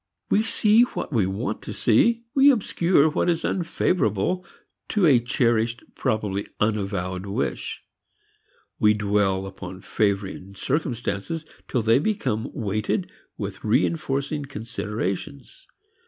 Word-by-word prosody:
We 210 Hz, -, +5 dB
see 220 Hz, 0 st, +4 dB
what 245 Hz, -10 st, -1 dB
we 105 Hz, -6 st, +2 dB
want 100 Hz, +3 st, -3 dB
to -, -, -6 dB
see, 230 Hz, -, +3 dB
we 275 Hz, +1 st, +7 dB
obscure 180 Hz, -, +3 dB
what 160 Hz, +3 st, +1 dB
is 165 Hz, -1 st, 0 dB
unfavorable 180 Hz, -, 0 dB, 0.5 s
to 205 Hz, -4 st, +2 dB
a 135 Hz, -6 st, +6 dB
cherished, 120 Hz, 0 st, +1 dB
probably 105 Hz, -5 st, -1 dB
unavowed, 100 Hz, -3 st, -1 dB
wish. 100 Hz, -, -3 dB, 1.0 s
We 105 Hz, 0 st, +5 dB
dwell 100 Hz, -2 st, +1 dB
upon 95 Hz, -1 st, -8 dB
favoring 100 Hz, -2 st, -1 dB
circumstances 135 Hz, +2 st, -2 dB, 0.2 s
till 125 Hz, -4 st, 0 dB
they 115 Hz, +3 st, +4 dB
become 135 Hz, -, -1 dB
weighted 110 Hz, -, -2 dB, 0.3 s
with 100 Hz, -2 st, -6 dB
reinforcing 140 Hz, +4 st, 0 dB
considerations. 115 Hz, -, -5 dB
115 Hz, 110 wpm, -24 LUFS, 100-160 Hz, 1.0 s, we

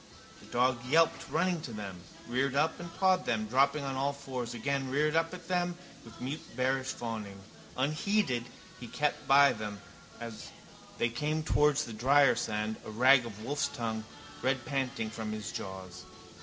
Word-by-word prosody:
The -, -, -15 dB
dog 125 Hz, 0 st, +1 dB
yelped 160 Hz, +5 st, +3 dB
running 180 Hz, -3 st, +1 dB
to 140 Hz, -, -6 dB
them, 100 Hz, -4 st, -6 dB, 0.3 s
reared 130 Hz, +3 st, 0 dB
up 155 Hz, +3 st, +2 dB
and 170 Hz, -1 st, -7 dB
pawed 185 Hz, -1 st, +3 dB
them, 110 Hz, -2 st, +1 dB
dropping 135 Hz, +6 st, +3 dB
on 135 Hz, -1 st, -2 dB
all 140 Hz, +2 st, 0 dB
fours, 130 Hz, -4 st, -5 dB
again 135 Hz, +2 st, -1 dB
reared 150 Hz, +3 st, +1 dB
up 165 Hz, 0 st, +2 dB
at 180 Hz, -2 st, -9 dB
them 175 Hz, -1 st, 0 dB, 0.3 s
with 115 Hz, -, -13 dB
mute 135 Hz, +5 st, -4 dB, 0.2 s
bearish 130 Hz, +1 st, +1 dB
fawning. 110 Hz, -6 st, -5 dB, 0.4 s
Unheeded 145 Hz, -, +1 dB, 0.3 s
he 120 Hz, -, -7 dB
kept 150 Hz, +5 st, -1 dB
by 140 Hz, +1 st, +7 dB
them 105 Hz, -2 st, -5 dB, 0.4 s
as 115 Hz, -2 st, -7 dB, 0.5 s
they 120 Hz, -, +2 dB
came 150 Hz, +6 st, -1 dB
towards 150 Hz, -1 st, +3 dB
the 115 Hz, -, -7 dB
drier 135 Hz, +6 st, +5 dB
sand, 110 Hz, 0 st, -2 dB
a -, -, -8 dB
rag 125 Hz, +3 st, +5 dB
of 105 Hz, -1 st, -9 dB
wolf's 140 Hz, +1 st, 0 dB
tongue 115 Hz, -4 st, -3 dB, 0.4 s
redpanting 130 Hz, -2 st, -1 dB
from 110 Hz, -1 st, -4 dB
his 105 Hz, -4 st, -5 dB
jaws. 95 Hz, -2 st, -7 dB
130 Hz, 165 wpm, -31 LUFS, 115-145 Hz, 0.5 s, by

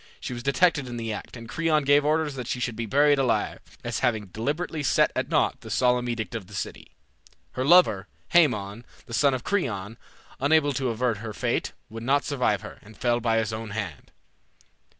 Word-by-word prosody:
She -, -, -5 dB
was 120 Hz, -, -5 dB
detected 140 Hz, +2 st, +2 dB
in 120 Hz, -1 st, -6 dB
the 115 Hz, -1 st, -3 dB
act, 105 Hz, -, -8 dB
and 115 Hz, 0 st, -10 dB
Creon 155 Hz, +2 st, +1 dB
gave 145 Hz, +1 st, +4 dB
orders 155 Hz, 0 st, +1 dB
that 125 Hz, -3 st, -6 dB
she 125 Hz, -, -2 dB
should 120 Hz, -2 st, -2 dB
be 115 Hz, 0 st, -4 dB
buried 145 Hz, +4 st, +4 dB
alive, 130 Hz, -3 st, 0 dB, 0.2 s
as 120 Hz, -1 st, -2 dB
having 110 Hz, -5 st, 0 dB
deliberately 150 Hz, -, -3 dB
set 145 Hz, -, +3 dB
at -, -, -1 dB
naught -, -, +1 dB
the -, -, -10 dB
solemn 125 Hz, -1 st, +2 dB
edict 115 Hz, -1 st, -3 dB
of 110 Hz, -6 st, -5 dB
the 105 Hz, -, -11 dB
city. 85 Hz, -, -6 dB, 0.6 s
Her 130 Hz, -, -2 dB
lover, 135 Hz, -, +5 dB, 0.2 s
Haemon, 115 Hz, -, +2 dB, 0.2 s
the 115 Hz, -, -10 dB
son 135 Hz, +3 st, +3 dB
of 125 Hz, -, -5 dB
Creon, 115 Hz, -, -2 dB, 0.4 s
unable 145 Hz, +1 st, +3 dB
to 130 Hz, -1 st, -1 dB
avert 115 Hz, -1 st, 0 dB
her 110 Hz, +1 st, -6 dB
fate, -, -, -1 dB
would 115 Hz, +1 st, -8 dB
not 140 Hz, +4 st, +2 dB
survive 125 Hz, -8 st, 0 dB
her, 105 Hz, -, -10 dB
and 110 Hz, +1 st, -16 dB
fell 120 Hz, -1 st, +1 dB
by 115 Hz, -1 st, +1 dB
his 110 Hz, -1 st, 0 dB
own 110 Hz, 0 st, -5 dB
hand. 95 Hz, -8 st, -6 dB
120 Hz, 200 wpm, -26 LUFS, 110-145 Hz, 0.6 s, lover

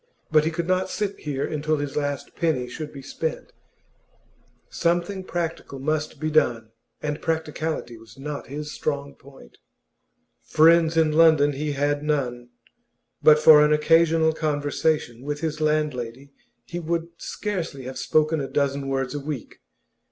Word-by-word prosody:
But 155 Hz, -1 st, +4 dB
he -, -, +2 dB
could 165 Hz, +1 st, -3 dB
not 185 Hz, 0 st, +1 dB
sit 205 Hz, -2 st, -3 dB
here 140 Hz, -2 st, -3 dB
until 155 Hz, 0 st, -1 dB
his 145 Hz, -1 st, -4 dB
last 145 Hz, -2 st, -3 dB
penny 150 Hz, -7 st, 0 dB
should 150 Hz, +4 st, -7 dB
be 135 Hz, -2 st, -10 dB
spent. 160 Hz, +3 st, -4 dB, 1.1 s
Something 175 Hz, +3 st, -1 dB
practical 165 Hz, -6 st, -4 dB
must 155 Hz, +2 st, -2 dB
be 155 Hz, +1 st, -2 dB
done, 115 Hz, -7 st, +1 dB, 0.3 s
and 150 Hz, -1 st, -3 dB
practicality 160 Hz, -6 st, -3 dB
was 110 Hz, +1 st, -16 dB
not 145 Hz, +1 st, -6 dB
his 150 Hz, +2 st, -6 dB
strong 140 Hz, -2 st, -3 dB
point. 135 Hz, -, -17 dB, 0.8 s
Friends 165 Hz, +1 st, +4 dB
in 160 Hz, -1 st, +4 dB
London 155 Hz, -2 st, +5 dB
he 145 Hz, +1 st, -3 dB
had 145 Hz, +1 st, 0 dB
none; 125 Hz, -5 st, -2 dB, 0.7 s
but 155 Hz, -1 st, +7 dB
for 150 Hz, -1 st, +8 dB
an 150 Hz, -, +3 dB
occasional 160 Hz, +1 st, +4 dB
conversation 145 Hz, -4 st, -1 dB
with 145 Hz, +2 st, -4 dB
his 155 Hz, -1 st, -3 dB
landlady 140 Hz, -4 st, -1 dB, 0.3 s
he 175 Hz, -, -5 dB
would 170 Hz, 0 st, -2 dB
scarcely 175 Hz, -10 st, -4 dB
have 130 Hz, +1 st, -6 dB
spoken 155 Hz, 0 st, +2 dB
a 135 Hz, -, -3 dB
dozen 140 Hz, -1 st, -1 dB
words 135 Hz, -1 st, -1 dB
in 145 Hz, -, -4 dB
a -, -, -15 dB
week. 150 Hz, -6 st, -6 dB
150 Hz, 150 wpm, -24 LUFS, 140-160 Hz, 1.1 s, for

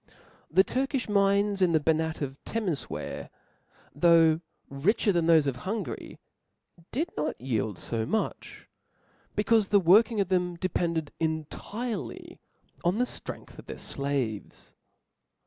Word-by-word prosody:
The 190 Hz, +4 st, +5 dB
Turkifh 270 Hz, +3 st, -1 dB
mines 200 Hz, 0 st, +2 dB
in 180 Hz, -2 st, +4 dB
the 160 Hz, -, +5 dB
Bannat 160 Hz, 0 st, 0 dB
of 135 Hz, 0 st, -6 dB
Temefwaer, 200 Hz, -10 st, -3 dB, 0.6 s
though 165 Hz, 0 st, +5 dB, 0.3 s
richer 195 Hz, +10 st, +1 dB
than 170 Hz, -3 st, +1 dB
thof^ 160 Hz, -3 st, +6 dB
of 135 Hz, -3 st, 0 dB
Hungary, 195 Hz, -, -5 dB, 0.7 s
did 320 Hz, +7 st, -1 dB
not 150 Hz, +1 st, -2 dB
yield 110 Hz, -6 st, -1 dB
fo 115 Hz, -1 st, -2 dB
nauch 220 Hz, -, -1 dB
j -, -, -13 dB, 0.7 s
becaufe 215 Hz, -1 st, +3 dB
the 205 Hz, -, +5 dB
li^orking 210 Hz, +5 st, +5 dB
of 195 Hz, -2 st, +1 dB
them 180 Hz, -1 st, +1 dB
depended 170 Hz, -3 st, -1 dB
entirely 165 Hz, -, -4 dB, 0.4 s
on 175 Hz, +4 st, +2 dB
the 250 Hz, -, +2 dB
(tr^ngth -, -, -7 dB
of -, -, -12 dB
their -, -, -6 dB
flaves. 135 Hz, -8 st, -3 dB
175 Hz, 130 wpm, -28 LUFS, 155-205 Hz, 0.7 s, thof^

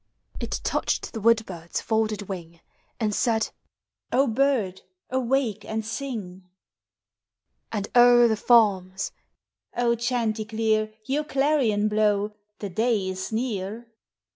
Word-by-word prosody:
It -, -, -3 dB
touched -, -, -1 dB
the 225 Hz, -, -5 dB
wood 225 Hz, 0 st, +4 dB
bird's 170 Hz, -2 st, -5 dB
folded 220 Hz, -2 st, 0 dB
wing, 170 Hz, -4 st, -8 dB, 0.4 s
And 215 Hz, -3 st, 0 dB
said, 220 Hz, 0 st, +1 dB, 0.3 s
" -, -, -51 dB
O -, -, +3 dB
bird, 230 Hz, -7 st, +1 dB, 0.3 s
awake 255 Hz, -4 st, 0 dB
and 220 Hz, 0 st, -3 dB
sing! 215 Hz, -7 st, -5 dB, 0.6 s
'' -, -, -54 dB
And 205 Hz, -2 st, -2 dB
o'er 240 Hz, 0 st, +7 dB
the 220 Hz, -, +2 dB
farms, 195 Hz, -5 st, +3 dB, 0.4 s
" -, -, -37 dB, 0.2 s
chanticleer, 220 Hz, -2 st, 0 dB
Your 285 Hz, +5 st, 0 dB
clarion 270 Hz, -8 st, +2 dB
blow; 210 Hz, -1 st, +1 dB, 0.2 s
the 205 Hz, -, -5 dB
day 215 Hz, -1 st, +1 dB
is 185 Hz, +2 st, -4 dB
near 225 Hz, 0 st, -3 dB
220 Hz, 120 wpm, -25 LUFS, 200-240 Hz, 0.6 s, o'er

